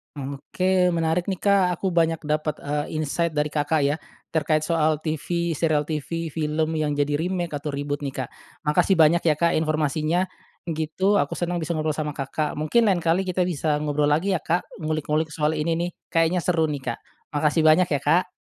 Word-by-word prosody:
Oke, 180 Hz, +7 st, 0 dB
menarik, 165 Hz, +1 st, +1 dB
nih, 185 Hz, -, -4 dB
Kak. 195 Hz, -3 st, +3 dB
Aku 195 Hz, -, -1 dB
banyak 165 Hz, -2 st, +2 dB
dapat, 155 Hz, 0 st, -1 dB
eee, 150 Hz, +2 st, -3 dB
insight 165 Hz, +2 st, 0 dB
dari 150 Hz, 0 st, 0 dB
Kakak, 150 Hz, +1 st, 0 dB
ya, 145 Hz, +1 st, +2 dB, 0.3 s
terkait 155 Hz, -1 st, +1 dB
soal 155 Hz, -1 st, +1 dB
TV, 165 Hz, +2 st, -2 dB
serial 150 Hz, -1 st, +1 dB
TV, 165 Hz, +2 st, -3 dB
film 155 Hz, +1 st, -1 dB
yang 155 Hz, -1 st, 0 dB
jadi 145 Hz, 0 st, 0 dB
remake 175 Hz, 0 st, -2 dB
atau 145 Hz, +1 st, -4 dB
reboot, 145 Hz, +1 st, -3 dB
nih, 140 Hz, -, -2 dB
Kak. 125 Hz, -, -3 dB, 0.4 s
Makasih 165 Hz, +4 st, +3 dB
banyak, 160 Hz, +2 st, +5 dB
ya, 155 Hz, -3 st, +3 dB
Kak, 170 Hz, 0 st, +3 dB
informasinya, 155 Hz, +3 st, 0 dB, 0.4 s
gitu, 160 Hz, +5 st, 0 dB
aku 145 Hz, -8 st, +1 dB
senang 175 Hz, -1 st, -1 dB
bisa 160 Hz, -, -3 dB
ngobrol 155 Hz, -2 st, -1 dB
sama 150 Hz, -1 st, -2 dB
Kakak. 150 Hz, +2 st, -3 dB
Mungkin 205 Hz, +8 st, +3 dB
lain 180 Hz, -, +1 dB
kali 170 Hz, +3 st, +1 dB
kita 180 Hz, -1 st, 0 dB
bisa 150 Hz, -2 st, 0 dB
ngobrol 150 Hz, 0 st, +1 dB
lagi, 185 Hz, +6 st, +2 dB
ya, 155 Hz, -, -3 dB
Kak, 175 Hz, +2 st, 0 dB, 0.2 s
ngulik-ngulik 155 Hz, 0 st, -1 dB
soal 155 Hz, 0 st, 0 dB
ini, 165 Hz, +2 st, 0 dB
nih, 175 Hz, -, -1 dB, 0.2 s
kayaknya 165 Hz, +1 st, +2 dB
seru, 165 Hz, -3 st, +2 dB
nih, 135 Hz, -5 st, -3 dB
Kak. -, -, -8 dB, 0.3 s
Makasih 150 Hz, +2 st, +2 dB
banyak, 160 Hz, +3 st, +5 dB
ya, 145 Hz, -2 st, -1 dB
Kak. 175 Hz, +5 st, +2 dB
155 Hz, 190 wpm, -24 LUFS, 150-170 Hz, 0.4 s, banyak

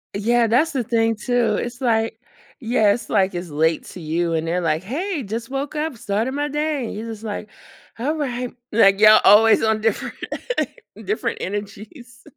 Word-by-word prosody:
Yeah, 230 Hz, +3 st, +2 dB
that's 270 Hz, +9 st, +2 dB
the 265 Hz, -5 st, -1 dB
thing 225 Hz, 0 st, +1 dB
too. 235 Hz, -1 st, 0 dB
It's 240 Hz, +4 st, -4 dB
like 225 Hz, -2 st, 0 dB, 0.4 s
yeah, 225 Hz, -4 st, +2 dB
it's 235 Hz, -1 st, -6 dB
like 190 Hz, -3 st, +1 dB
it's 175 Hz, 0 st, -5 dB
late 160 Hz, +2 st, +1 dB
to -, -, -10 dB
you 165 Hz, +2 st, -1 dB
and 160 Hz, 0 st, -1 dB
they're 175 Hz, +2 st, 0 dB
like, 160 Hz, 0 st, 0 dB
"Hey, 315 Hz, -, -3 dB
just 225 Hz, +3 st, -5 dB
woke 275 Hz, +3 st, -4 dB
up, 300 Hz, -4 st, -3 dB
started 215 Hz, +5 st, -2 dB
my 290 Hz, +1 st, -1 dB
day," 295 Hz, -2 st, -2 dB
and -, -, -5 dB
you're 215 Hz, +2 st, -6 dB
just 220 Hz, -1 st, -9 dB
like, 215 Hz, -1 st, -5 dB, 0.5 s
"All 290 Hz, +7 st, -1 dB
right," 250 Hz, -5 st, -3 dB, 0.2 s
like, 195 Hz, -3 st, +5 dB
y'all 215 Hz, 0 st, +8 dB
always 220 Hz, +3 st, +6 dB
on 220 Hz, -1 st, +1 dB
different 220 Hz, -1 st, -1 dB, 0.9 s
different 425 Hz, -, -2 dB
energies. 210 Hz, +5 st, -7 dB
225 Hz, 180 wpm, -21 LUFS, 205-250 Hz, 0.9 s, y'all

